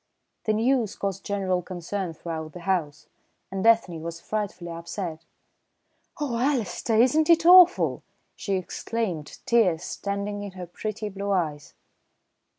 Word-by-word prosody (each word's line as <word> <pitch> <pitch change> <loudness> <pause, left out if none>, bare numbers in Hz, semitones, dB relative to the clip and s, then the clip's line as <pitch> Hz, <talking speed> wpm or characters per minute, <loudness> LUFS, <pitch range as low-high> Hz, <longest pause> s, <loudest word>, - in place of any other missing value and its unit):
The 215 - +2
news 230 -1 +1
caused 195 -1 -3
general 190 -3 0
concern 180 0 -4
throughout 160 -1 -6
the 180 - -9
house, 170 -5 -1 0.5
and 195 0 -3
Ethne 205 -8 +3
was 165 0 -6
frightfully 190 -4 -4
upset. 170 -1 -6 0.9
"Oh, 255 -6 -1
Alister, 240 -4 0
isn't 260 +8 +4
it 335 0 +5
awful?" 360 0 +7 0.3
she 195 - -2
exclaimed, 185 -3 -3
tears 185 -8 +3
standing 200 +1 -3
in 200 -2 -7
her 185 -1 -7
pretty 215 +4 -5
blue 200 0 -5
eyes. 155 -7 -1
195 Hz, 130 wpm, -26 LUFS, 170-225 Hz, 0.9 s, awful